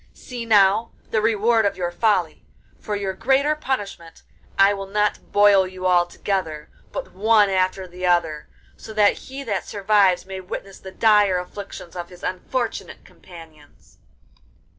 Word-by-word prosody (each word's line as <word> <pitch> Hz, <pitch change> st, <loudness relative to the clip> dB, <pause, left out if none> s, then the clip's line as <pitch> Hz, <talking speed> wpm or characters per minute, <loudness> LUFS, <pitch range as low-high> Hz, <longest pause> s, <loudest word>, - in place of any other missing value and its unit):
See, 240 Hz, -2 st, -8 dB
now, 210 Hz, +1 st, +4 dB, 0.2 s
the 220 Hz, -, +1 dB
reward 225 Hz, +1 st, +2 dB
of 200 Hz, -3 st, 0 dB
your 175 Hz, -1 st, -2 dB
folly; 180 Hz, -5 st, 0 dB, 0.4 s
for 210 Hz, -, -4 dB
your 195 Hz, -2 st, -3 dB
greater 270 Hz, +8 st, +1 dB
punishment 205 Hz, -, -5 dB, 0.3 s
I 195 Hz, +1 st, +5 dB
will 195 Hz, -1 st, -6 dB
not 210 Hz, +1 st, -1 dB
boil 205 Hz, -2 st, +5 dB
you 185 Hz, 0 st, -8 dB
all 175 Hz, -1 st, +3 dB
together, 170 Hz, -5 st, -4 dB, 0.2 s
but -, -, -6 dB
one 210 Hz, 0 st, +3 dB
after 185 Hz, 0 st, 0 dB
the 180 Hz, +1 st, -4 dB
other, 165 Hz, -4 st, 0 dB, 0.3 s
so 220 Hz, -, -11 dB
that 210 Hz, -1 st, +4 dB, 0.2 s
he 270 Hz, +1 st, -6 dB
that 205 Hz, -7 st, -3 dB
survives 195 Hz, -3 st, +2 dB
may 190 Hz, 0 st, -7 dB
witness 195 Hz, +1 st, -8 dB
the 190 Hz, -, -10 dB
dire 205 Hz, -2 st, +3 dB
afflictions 180 Hz, -1 st, -8 dB
of 175 Hz, -1 st, -6 dB
his 180 Hz, -1 st, -15 dB
unfortunate 230 Hz, +6 st, -4 dB
companions. 160 Hz, -4 st, -17 dB
195 Hz, 150 wpm, -22 LUFS, 180-215 Hz, 0.4 s, I